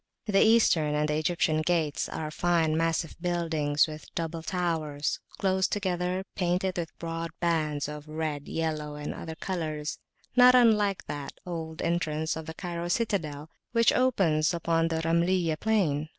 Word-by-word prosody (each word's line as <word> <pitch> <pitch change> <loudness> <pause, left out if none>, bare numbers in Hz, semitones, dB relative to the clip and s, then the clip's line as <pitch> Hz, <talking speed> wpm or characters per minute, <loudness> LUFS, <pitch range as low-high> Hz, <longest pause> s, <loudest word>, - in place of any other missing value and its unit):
The 195 -2 +3
Eastern 175 -10 +4
and 150 0 +1
the 150 - +1
Egyptian 155 -1 +1
gates 160 -3 0
are 155 -1 -4
fine 165 -1 +1
massive 165 0 0
buildings, 165 -4 +1
with 155 -1 -9
double 165 0 -3
towers 160 -4 -1 0.2
close 190 -1 +2
together, 185 -2 -1
painted 180 0 0
with 165 -2 -5
broad 165 0 -4
bands 155 -4 0
of 150 0 -8
red, 155 -2 -3
yellow, 155 -2 -2
and 150 0 -5
other 160 -1 -7
colors, 155 -4 -3 0.4
not 250 0 +8
unlike 210 -5 +4
that 145 -1 -5
old 160 -2 -5
entrance 160 -2 0
of 160 0 -7
the 160 - -6
Cairo 175 -2 -4
citadel 165 -8 -1 0.2
which 230 -1 +4
opens 180 -11 +2
upon 165 0 +1
the 160 -1 -1
Ramayliyah 170 -1 +1
plain. 160 -9 +1
165 Hz, 150 wpm, -28 LUFS, 155-180 Hz, 0.4 s, not